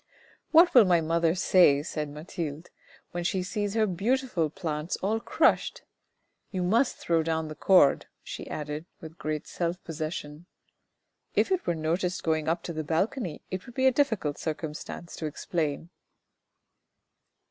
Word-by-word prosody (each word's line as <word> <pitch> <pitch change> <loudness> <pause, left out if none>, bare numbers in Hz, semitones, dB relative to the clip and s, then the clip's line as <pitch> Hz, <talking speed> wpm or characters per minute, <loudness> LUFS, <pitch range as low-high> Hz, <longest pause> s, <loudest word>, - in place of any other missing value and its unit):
" - - -29
What 340 +2 +7
will 245 -5 +8
my 175 -2 +4
mother 165 +1 +1
say," 175 -6 +5
said 150 -2 -4
Mathilde, 155 +1 -6 0.2
" - - -26
when 175 0 -3
she 185 +1 0
sees 205 +2 -2
her 220 -1 +4
beautiful 210 -2 0
plants 155 0 -3
all 215 +3 +1
crushed? - - +1 0.7
You 185 -2 -2
must 230 +9 +2
throw 165 -1 +1
down 160 -1 -1
the - - -5
cord," 180 -3 +4 0.2
she - - -7
added 150 +2 -5
with 160 +1 -11
great 155 -1 -3
self 175 +1 -2
possession. 155 0 -5 0.9
"If - - +2
it 370 -1 0
were 170 - +1
noticed 170 +3 -1
going 160 -1 0
up 170 +2 0
to 170 - -5
the 155 0 -3
balcony, 170 - -1
it 185 +4 -5
would 240 - -12
be 260 - +1
a 265 - +7
difficult 225 - 0
circumstance 160 +1 -5
to 155 - -3
explain." 160 0 -3
170 Hz, 160 wpm, -28 LUFS, 155-190 Hz, 0.9 s, will